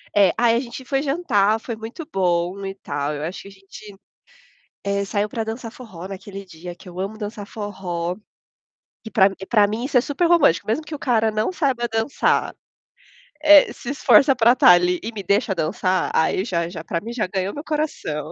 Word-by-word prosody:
é, 200 -4 +5
aí 230 0 +3
a 235 - +2
gente 255 +1 -7
foi 270 +1 0
jantar, 225 - +1
foi 230 0 -6
muito 225 +9 -8
bom 180 +1 0
e 195 - -4
tal, 145 -5 -3
eu 145 +1 -5
acho 175 +4 -5
que - - -12
a - - -12
gente, 195 +1 -13 0.9
eh, 200 0 -1
saiu 205 +1 -1
para 225 +1 -3
dançar 225 +1 -6
forró 190 -9 -10
naquele 195 +1 -8
dia 175 0 -10
que 180 - -14
eu 180 +1 -9
amo 200 +3 -4
dançar 210 -1 -6
forró, 180 -5 -4 0.9
que 220 - -9
para 195 -5 +5
m 195 - 0
para 210 -3 +4
mim 220 +4 -3
isso 270 - -2
é - - +7
super 285 +5 0
romântico, 335 - +4
mesmo 265 +9 -1
que 305 - -7
o 295 - -5
cara 225 -5 +1
não 215 +10 -1
saiba 265 -8 0
dançar, 225 +5 0 0.9
eh, 305 -1 +7
se 240 - -8
esforça 280 -1 +5
para 235 0 +5
estar 250 - +6
ali 180 0 +4
e 225 - -4
me 215 - -6
deixa 200 +3 +1
dançar, 185 +3 0
aí 175 +4 +1
já 170 -6 -1
já 170 -2 -8
para 170 - -2
mim 230 +5 -7
já 230 -4 -1
ganhou 190 +1 -2
meu 290 - -7
coração. 300 - -3
205 Hz, 205 wpm, -22 LUFS, 185-240 Hz, 0.9 s, é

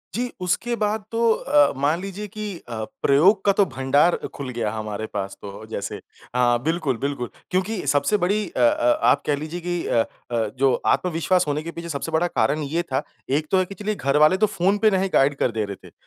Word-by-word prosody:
जी, 245 +1 -2
उसके 200 +7 0
बाद 215 -1 -1
तो 230 0 +3
अ, 145 -8 +3
मान 155 +5 +1
लीजिए 195 +2 -6
कि 215 +2 -7 0.3
अ, 110 -2 -4 0.2
प्रयोग 185 +9 +4
का 200 - +6
तो 200 - +6
भंडार 140 +3 +2 0.2
खुल 140 -2 -5
गया 115 -4 -2
हमारे 110 -1 -4
पास 100 -1 -4
तो 100 +2 -9
जैसे। 100 - -4 0.4
हाँ 120 -1 +3
बिल्कुल, 155 -5 0
बिल्कुल 140 -1 -3 0.2
क्योंकि 190 +2 -1
सबसे 145 +9 +2
बड़ी 205 +3 0
अ, - - -6
अ, 120 0 +3
आप 145 - +4
कह 145 - +2
लीजिए 155 +4 -5
कि 175 0 -2
अ, 115 - +3 0.3
अ, 115 -2 0
जो 135 0 +3
आत्मविश्वास 180 0 +1
होने 150 +1 -1
के 170 - -5
पीछे 170 0 -7
सबसे 155 +1 -4
बड़ा 160 +2 +2
कारण 155 -2 0
ये 160 +5 -1
था 130 - +1 0.4
एक 155 - -3
तो 190 - +4
है 185 - +2
कि 195 - -10
चलिए 210 +1 -3
घरवाले 150 +4 +3
तो 215 - +4
फ़ोन 190 +4 +3
पे 215 - +7
नहीं 190 +1 0
गाइड 140 +1 +4
कर - - +1
दे 110 -1 -1
रहे 100 -2 -9
थे। - - -16
155 Hz, 215 wpm, -23 LUFS, 130-190 Hz, 0.4 s, पे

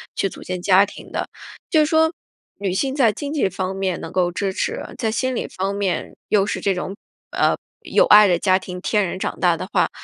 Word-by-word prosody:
去 195 - 0
组 - - -12
建 185 -1 -5
家 190 +1 +5
庭 205 - -12
的。 - - -3 0.4
就 315 -6 +4
说 320 +1 +3 0.5
女 195 -2 -1
性 265 +8 -1
在 250 -6 +4
经 285 +7 -5
济 290 -9 +2
方 185 +1 -3
面 190 -2 -2
能 165 - -7
够 180 -1 +1
支 195 +2 -2
持， - - -2 0.2
在 220 - -1
心 260 +3 -1
理 - - -2
方 195 +2 -3
面 195 -4 -2
又 205 -2 +4
是 205 - -2
这 200 - +1
种， 185 +2 -4 0.3
呃， - - +2 0.3
有 - - +3
爱 210 0 +8
的 175 -2 +2
家 185 0 +3
庭， 180 -1 -7
天 210 +1 +1
然 185 - -5
长 - - -3
大 - - +3
的 - - -6
话， - - +2
195 Hz, 240 characters per minute, -21 LUFS, 185-220 Hz, 0.5 s, 爱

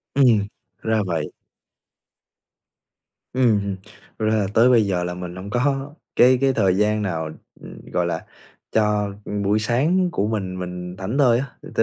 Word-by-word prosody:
Ừm, 120 -7 +4 0.4
ra 110 -1 +1
vậy. 80 -4 -2 2.0
Ừm, 120 -5 +3
ừm. 100 -1 -3 0.4
Thật 110 - 0
ra 110 - +2
là 105 -3 +1
tới 115 +3 +5
bây 115 -4 +5
giờ 90 -3 0
là 90 0 -3
mình 90 0 -7
hông 95 +2 -7
có 135 +4 0 0.2
cái 125 +1 +6
cái 135 -1 +3
thời 95 -6 +2
gian 105 +1 +2
nào 80 -6 -2 0.6
gọi - - +1
là - - -3 0.5
cho 105 -2 +1 0.3
buổi 105 +2 +2
sáng 150 +12 +2
của 100 -7 0
mình 95 -4 -3
mình 90 0 -6
thảnh 100 +7 -3
thơi 125 -5 +4
á. 135 - -2 0.2
Thật - - -10
105 Hz, 160 wpm, -22 LUFS, 95-125 Hz, 2.0 s, cái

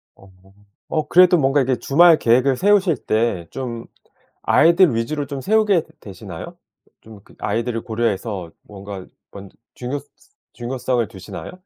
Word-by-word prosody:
어. 95 -1 -19 0.6
어 155 -2 -1
그래도 180 0 +6
뭔가 135 0 +2
이게 130 0 +1
주말 165 +3 +5
계획을 125 +3 +2
세우실 195 -6 +3
때 110 -7 0
좀 120 -3 -6 0.6
아이들 170 -3 +4
위주로 145 +6 -2
좀 140 -1 -6
세우게 205 -1 +2
되 - - -29
되시나요? 95 -3 -10 0.4
좀 110 -2 -14
그 - - -20
아이들을 115 +2 -2
고려해서 110 -5 -3
뭔가 100 -2 -10 0.3
먼저 100 -1 -12 0.2
중요스츠 140 +4 -6 0.4
중요성을 125 -1 -2
두시나요? 95 - -9
125 Hz, 310 characters per minute, -20 LUFS, 110-150 Hz, 0.6 s, 그래도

